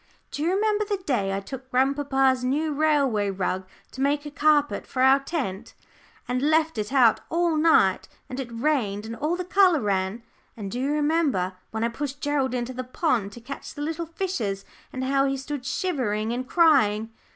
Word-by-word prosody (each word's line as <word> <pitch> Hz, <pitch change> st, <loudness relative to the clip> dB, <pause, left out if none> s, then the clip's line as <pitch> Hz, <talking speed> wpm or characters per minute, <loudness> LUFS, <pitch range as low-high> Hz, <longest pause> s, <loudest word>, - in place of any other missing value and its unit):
"Do -, -, -5 dB
you 325 Hz, -, +1 dB
remember 420 Hz, +2 st, +1 dB
the 410 Hz, -1 st, -2 dB
day 245 Hz, -, -1 dB
I 195 Hz, -, -1 dB
took 260 Hz, +6 st, -9 dB
grandpapa's 270 Hz, 0 st, +2 dB
new 295 Hz, +4 st, 0 dB
railway 280 Hz, -9 st, +2 dB
rug 185 Hz, -1 st, -2 dB, 0.2 s
to 265 Hz, -, -7 dB
make 285 Hz, +2 st, +1 dB
a 295 Hz, -, -6 dB
carpet 295 Hz, 0 st, +2 dB
to 255 Hz, -, -4 dB
our 265 Hz, +1 st, +6 dB
tent, 250 Hz, -, -4 dB, 0.5 s
and 250 Hz, +1 st, -1 dB
left 315 Hz, -2 st, +2 dB
it 210 Hz, +2 st, -3 dB
out 250 Hz, -5 st, +5 dB
all 340 Hz, -1 st, +1 dB
night, 305 Hz, -, +3 dB, 0.2 s
and 255 Hz, -, -6 dB
it 260 Hz, -3 st, -4 dB
rained 230 Hz, -5 st, -1 dB
and 225 Hz, +1 st, -6 dB
all 305 Hz, +8 st, -1 dB
the 360 Hz, 0 st, -4 dB
colour 365 Hz, -3 st, +4 dB
ran? 200 Hz, +1 st, -1 dB, 0.3 s
And 200 Hz, -3 st, -6 dB
do 245 Hz, -, -3 dB
you 275 Hz, +3 st, 0 dB
remember 295 Hz, -, +1 dB, 0.2 s
when 220 Hz, 0 st, -3 dB
I 230 Hz, -, +1 dB
pushed 280 Hz, +3 st, -5 dB
Gerald 275 Hz, -3 st, 0 dB
into 245 Hz, +1 st, -3 dB
the 255 Hz, +1 st, -4 dB
pond 250 Hz, -, -1 dB
to 240 Hz, -, -11 dB
catch 275 Hz, +6 st, -8 dB
the 290 Hz, -, -4 dB
little 325 Hz, +2 st, -3 dB
fishes, 305 Hz, -, -3 dB, 0.3 s
and 260 Hz, -, -4 dB
how 275 Hz, +1 st, +2 dB
he 270 Hz, 0 st, -1 dB
stood 270 Hz, -1 st, -5 dB
shivering 235 Hz, -, -1 dB
and 255 Hz, +2 st, -4 dB
crying?" 225 Hz, -10 st, +3 dB
270 Hz, 190 wpm, -25 LUFS, 230-305 Hz, 0.5 s, our